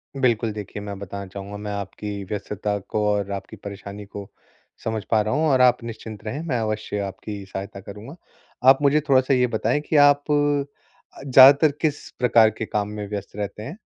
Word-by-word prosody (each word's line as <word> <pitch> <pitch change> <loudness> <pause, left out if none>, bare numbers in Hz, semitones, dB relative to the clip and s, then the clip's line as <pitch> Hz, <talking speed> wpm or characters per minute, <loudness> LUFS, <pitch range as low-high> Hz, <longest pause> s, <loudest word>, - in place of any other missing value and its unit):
बिल्कुल, 120 -4 +1
देखिए 105 -1 -7
मैं 100 -1 -6
बताना 100 0 -7
चाहूँगा, 100 +2 -8
मैं 105 0 -5
आपकी 100 0 -5
व्यस्तता 105 +1 -3
को 105 - 0
और 100 -1 -1
आपकी 100 -1 -6
परेशानी 100 0 -9
को 100 0 -9 0.5
समझ 110 -2 -2
पा 110 -2 +4
रहा 110 +1 -1
हूँ 160 +1 +2
और 130 -2 +4
आप 125 -1 +4
निश्चिंत 110 -2 -8
रहें, 130 +7 -4
मैं 125 -6 0
अवश्य 110 -1 -3
आपकी 100 +1 -7
सहायता 95 +1 -7
करूँगा। 105 - -10 0.5
आप 135 - +7
मुझे 145 +1 +4
थोड़ा-सा 130 0 +4
ये 125 -1 +3
बताएँ 115 +3 0
कि - - +1
आप 145 0 +4 1.0
ज़्यादातर 140 +3 +8
किस 150 -3 -1
प्रकार 115 -3 +5
के 110 - -3
काम 105 -1 -2
में 105 -1 -6
व्यस्त 100 -2 -6
रहते 105 +1 -5
हैं? 150 - -7
105 Hz, 180 wpm, -23 LUFS, 100-125 Hz, 1.0 s, ज़्यादातर